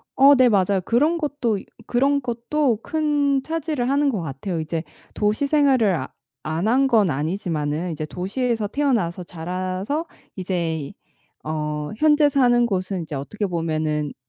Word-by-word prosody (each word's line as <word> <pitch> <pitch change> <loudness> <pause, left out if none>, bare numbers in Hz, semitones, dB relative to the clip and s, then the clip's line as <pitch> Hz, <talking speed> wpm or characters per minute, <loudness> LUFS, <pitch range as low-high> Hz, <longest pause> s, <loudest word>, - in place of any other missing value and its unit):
어 280 +2 +7
네 255 -1 +5
맞아요. 195 -2 +2
그런 300 +9 +2
것도 280 - -1 0.3
그런 275 +3 +2
것도 240 0 0
큰 290 -3 +1
차지를 310 -6 -2
하는 280 +1 +2
것 210 -8 -2
같아요. 160 +4 -4
이제 160 +1 -3 0.3
도시 210 +6 +1
생활을 270 - +3
아 130 -5 -4 0.4
안 160 +6 -1
한 265 +4 +3
건 220 -8 +3
아니지만은 160 +1 -2
도시에서 220 +4 -2
태어나서 215 -10 0
자라서 185 - -3 0.3
이제 180 -3 -2
이 145 -3 -7 0.5
어 150 -1 -3
현재 300 +1 +4
사는 245 -3 +3
곳은 185 -4 -2
이제 155 -2 -6
어떻게 205 +10 -3
보면은 155 -4 -1
210 Hz, 285 characters per minute, -22 LUFS, 170-275 Hz, 0.5 s, 어